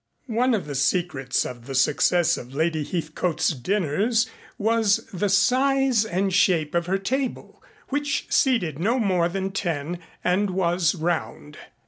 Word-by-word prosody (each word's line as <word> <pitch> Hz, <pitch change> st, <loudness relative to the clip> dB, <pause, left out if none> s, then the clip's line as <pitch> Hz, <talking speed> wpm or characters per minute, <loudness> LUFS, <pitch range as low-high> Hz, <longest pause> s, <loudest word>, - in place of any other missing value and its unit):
One 245 Hz, +2 st, +2 dB
of 205 Hz, -, -3 dB
the 145 Hz, -, -6 dB
secrets 140 Hz, -2 st, 0 dB
of 120 Hz, -1 st, -8 dB
the 135 Hz, -, -5 dB
success 150 Hz, +6 st, +3 dB
of 125 Hz, +2 st, -9 dB
Lady 160 Hz, 0 st, 0 dB
Heathcote's 165 Hz, +1 st, -1 dB
dinners 195 Hz, -, 0 dB, 0.3 s
was 225 Hz, -1 st, +2 dB
the 195 Hz, +3 st, -1 dB
size 255 Hz, +3 st, +3 dB
and 190 Hz, -1 st, -1 dB
shape 170 Hz, -5 st, +2 dB
of 170 Hz, 0 st, 0 dB
her 190 Hz, +2 st, +1 dB
table, 255 Hz, +7 st, -4 dB, 0.3 s
which 285 Hz, 0 st, -1 dB
seated 185 Hz, -, +1 dB
no 225 Hz, +9 st, +1 dB
more 185 Hz, -7 st, +1 dB
than 195 Hz, +1 st, -3 dB
ten 170 Hz, -3 st, -3 dB, 0.2 s
and 190 Hz, +3 st, +1 dB
was 175 Hz, -2 st, +1 dB
round. 160 Hz, -3 st, -3 dB
180 Hz, 140 wpm, -24 LUFS, 155-220 Hz, 0.3 s, success